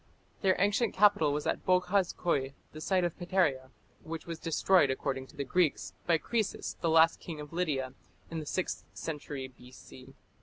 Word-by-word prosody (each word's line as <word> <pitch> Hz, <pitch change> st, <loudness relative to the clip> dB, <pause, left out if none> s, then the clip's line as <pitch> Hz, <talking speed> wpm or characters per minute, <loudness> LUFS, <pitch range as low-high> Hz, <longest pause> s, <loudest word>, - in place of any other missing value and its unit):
Their 190 Hz, -2 st, +4 dB
ancient 205 Hz, +3 st, +1 dB
capital 200 Hz, -7 st, +5 dB
was 145 Hz, +1 st, -2 dB
at -, -, -1 dB
Boghaz 185 Hz, +1 st, +2 dB
Köi, 140 Hz, -6 st, 0 dB, 0.2 s
the 155 Hz, -, -9 dB
site 185 Hz, +2 st, +1 dB
of 175 Hz, -2 st, -1 dB
Pteria, 170 Hz, -8 st, +1 dB, 0.3 s
which 165 Hz, 0 st, -7 dB
was 165 Hz, -1 st, -6 dB
destroyed, 165 Hz, -1 st, +3 dB
according 130 Hz, 0 st, -2 dB
to -, -, -18 dB
the 140 Hz, -, -2 dB
Greeks, 175 Hz, +1 st, +1 dB
by 170 Hz, -1 st, +4 dB
Croesus, 220 Hz, +4 st, -2 dB
the 165 Hz, -, +1 dB
last 160 Hz, +1 st, +5 dB
King 160 Hz, -3 st, -7 dB
of 150 Hz, +1 st, -9 dB
Lydia, 140 Hz, -7 st, -1 dB, 0.4 s
in 165 Hz, -, -3 dB
the 155 Hz, -, -7 dB
sixth 185 Hz, -, -2 dB
century 145 Hz, -4 st, -5 dB
B.C. 130 Hz, +1 st, -14 dB
165 Hz, 175 wpm, -31 LUFS, 140-180 Hz, 0.4 s, capital